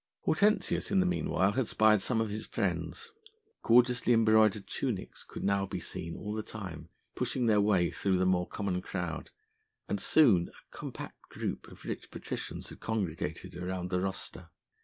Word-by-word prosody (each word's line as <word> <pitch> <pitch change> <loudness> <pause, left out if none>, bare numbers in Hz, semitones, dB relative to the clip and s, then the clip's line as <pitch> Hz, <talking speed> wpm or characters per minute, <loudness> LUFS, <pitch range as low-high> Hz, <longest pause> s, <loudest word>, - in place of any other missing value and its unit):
Hortensius 205 +6 +2
in 195 - +3
the 185 - +4
meanwhile 100 - +1
had 125 +1 0
spied 110 -2 +4
some 115 0 +1
of 110 -2 -1
his 105 +1 -4
friends. 460 0 -2 0.5
Gorgeously 125 +1 +4
embroidered 110 -2 +4
tunics - - -3
could - - -8
now 100 0 +1
be 95 -1 -4
seen 85 -1 -4
all 105 0 -5
the 110 - -2
time 95 -7 -8 0.2
pushing 125 - -1
their 105 -2 +4
way 95 -4 +3
through 95 -2 +1
the 95 - +2
more 90 -1 +2
common 95 -3 -2
crowd, 90 -4 -4 0.6
and - - -1
soon 110 - +5
a - - -19
compact - - -7
group - - -4
of - - -14
rich - - -5
patricians - - -6
had - - -11
congregated 95 -10 -3
around 90 0 -4
the 90 -1 +1
rostra. 95 0 -4
105 Hz, 165 wpm, -31 LUFS, 90-115 Hz, 0.6 s, soon